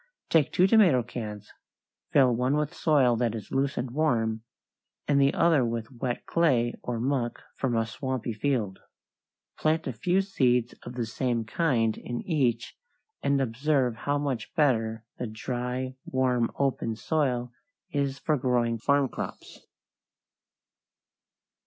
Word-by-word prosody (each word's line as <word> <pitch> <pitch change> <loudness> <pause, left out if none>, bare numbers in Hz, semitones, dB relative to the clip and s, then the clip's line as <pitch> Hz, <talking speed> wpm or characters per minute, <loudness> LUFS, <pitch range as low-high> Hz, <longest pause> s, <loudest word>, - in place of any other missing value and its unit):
= - - -53
Take 160 -4 +4
two 180 - +4
tomato 190 - +5
cans; 105 -3 -7 0.6
fill 130 -4 +5
one 130 +4 +1
with 150 +2 -1
soil 140 -9 +3
that 115 -1 0
is 105 -3 -8
loose 135 +1 0
and 120 0 -2
warm, 115 -7 +1 0.7
and 140 -1 +3
the 140 0 +5
other 160 -5 +3
with 115 0 -3
wet 120 -1 -4
clay 130 -8 +2
or 120 -2 -3
muck 125 -1 -1
from 125 -3 -1
a 115 - +2
swampy 125 0 -3
field. 105 -4 -1 0.8
Plant 160 +1 +1
a 130 - -3
few 175 - +1
seeds 125 - +1
of 120 - -9
the 120 -2 -1
same 115 0 -1
kind 115 -5 +1
in 120 -1 -5
each 125 -9 0 0.5
and 140 0 +2
observe 130 0 +1
how 145 +5 -1
much 135 -6 -3
better 115 -7 +1
the 125 - -2
dry, 125 +3 -3
warm, 125 -3 +1
open 130 -5 0
soil 125 -3 -1 0.4
is 140 -2 -1
for 155 +2 0
growing 120 -2 +1
farm 140 +3 +3
crops. - - -8
125 Hz, 140 wpm, -27 LUFS, 115-140 Hz, 0.8 s, tomato